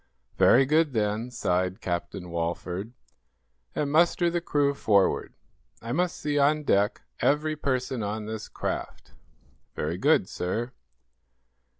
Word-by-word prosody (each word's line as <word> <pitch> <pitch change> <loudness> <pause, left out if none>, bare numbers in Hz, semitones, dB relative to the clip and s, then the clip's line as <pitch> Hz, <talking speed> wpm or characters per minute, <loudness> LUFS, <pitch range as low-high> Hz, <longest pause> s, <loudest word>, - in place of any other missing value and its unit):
"Very 135 +3 +6
good, 155 +1 +2
then," 110 +2 -1
sighed 95 -6 -1
Captain 90 0 -4
Walford. 90 +5 -3 0.8
"And 145 -1 -1
muster 170 +2 +3
the 175 0 -1
crew 145 -4 +1
forward. 100 -7 +1 0.4
I 115 - -6
must 175 +5 0
see 145 -1 -1
on 150 +2 +3
deck 105 -3 +2 0.2
every 155 +2 +1
person 130 -4 -2
on 105 +1 -3
this 110 0 -5
craft." - - -5 0.6
"Very 80 +4 -2
good, 145 -8 +3
sir." 115 +8 -3
120 Hz, 120 wpm, -27 LUFS, 100-150 Hz, 0.8 s, Very